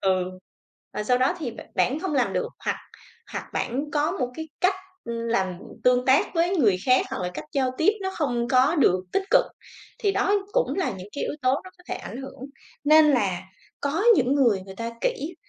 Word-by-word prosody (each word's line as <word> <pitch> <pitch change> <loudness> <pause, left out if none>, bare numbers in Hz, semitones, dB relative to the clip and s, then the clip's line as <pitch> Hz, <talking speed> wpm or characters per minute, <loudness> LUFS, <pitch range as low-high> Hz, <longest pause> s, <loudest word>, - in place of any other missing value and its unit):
Ừ. 185 -1 +2 0.7
Và - - -3
sau 250 +3 +3
đó 260 +7 +2
thì 290 -8 -3
b 230 - -10
bản 280 +5 +1
không 355 -5 -2
làm 255 -3 +2
được 470 - -1 0.2
hoặc - - +1 0.6
hoặc - - -4
bản 275 +5 -2
có 295 0 +1
một 255 -10 -1
cái 320 0 -6
cách 370 +1 +3 0.3
làm 230 -6 -1 0.3
tương 250 0 +4
tác 265 +1 +5
với 350 +3 +2
người 215 - +4
khác 255 0 +4
hoặc 265 - -3
là 180 - -2
cách - - -5
giao 265 -2 +1
tiếp 345 +6 +4
nó 380 - -1
không 245 -6 -1
có 265 +5 +4
được 185 - +4
tích - - +2
cực, - - +6 0.5
thì 405 -2 +1
đó 400 +1 +2 0.2
cũng - - +1
là 380 - 0
những 190 0 -8
cái 285 - -3
yếu - - -2
tố 255 - +3
nó 370 - -10
có 360 - -20
thể - - -2
ảnh - - -8
hưởng. 270 0 -10 0.4
Nên 305 0 +7
là 195 -9 +1 0.4
có 295 +8 -1
những 260 +2 +2
người 235 -9 +3
người 190 0 -10
ta 230 +1 -4
kỹ, 410 -10 -2
265 Hz, 215 wpm, -25 LUFS, 235-320 Hz, 0.7 s, Nên